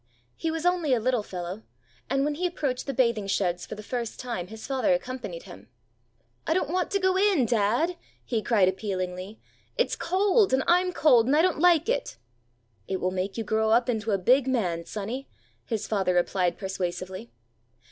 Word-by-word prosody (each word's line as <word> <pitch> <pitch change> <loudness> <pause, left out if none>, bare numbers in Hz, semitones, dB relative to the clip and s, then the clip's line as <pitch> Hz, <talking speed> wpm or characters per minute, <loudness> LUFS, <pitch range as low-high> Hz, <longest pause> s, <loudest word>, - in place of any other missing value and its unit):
He 325 - -2
was 325 +1 -3
only 345 -7 +2
a - - 0
little 250 0 +1
fellow, 180 0 -6 0.5
and 275 +1 +1
when 295 - 0
he 355 +5 -1
approached 285 -8 -3
the - - 0
bathing 235 -5 +1
sheds 180 -2 -1
for - - -6
the 215 - -9
first 235 0 -4
time 235 -9 -4
his 220 +2 -9
father 270 +1 +2
accompanied 260 - -6
him. - - -13 0.8
'I 320 - +2
don't 360 - 0
want 365 0 0
to 395 - 0
go 375 -1 +2
in, 385 -10 +3
dad,' 240 - +1 0.3
he 230 -3 -1
cried 210 -5 +3
appealingly; 190 0 -3 0.4
'it's - - +1
cold, 385 - +2
and 265 0 +3
I'm 360 +1 +3
cold, 250 -9 +4
and 275 - +3
I 315 - +4
don't 365 -4 +1
like 340 -1 +4
it!' - - -1 0.7
'It 190 - -2
will 185 - 0
make 190 +2 -3
you 225 - -1
grow 220 0 +1
up 235 +3 +3
into 225 -2 -1
a 200 - +2
big 255 +8 +3
man, 180 -10 0
sonny!' 225 +8 -5 0.4
his 220 -3 -3
father 190 -4 0
replied 180 0 +1
persuasively. 190 +2 -4
235 Hz, 190 wpm, -27 LUFS, 195-305 Hz, 0.8 s, cold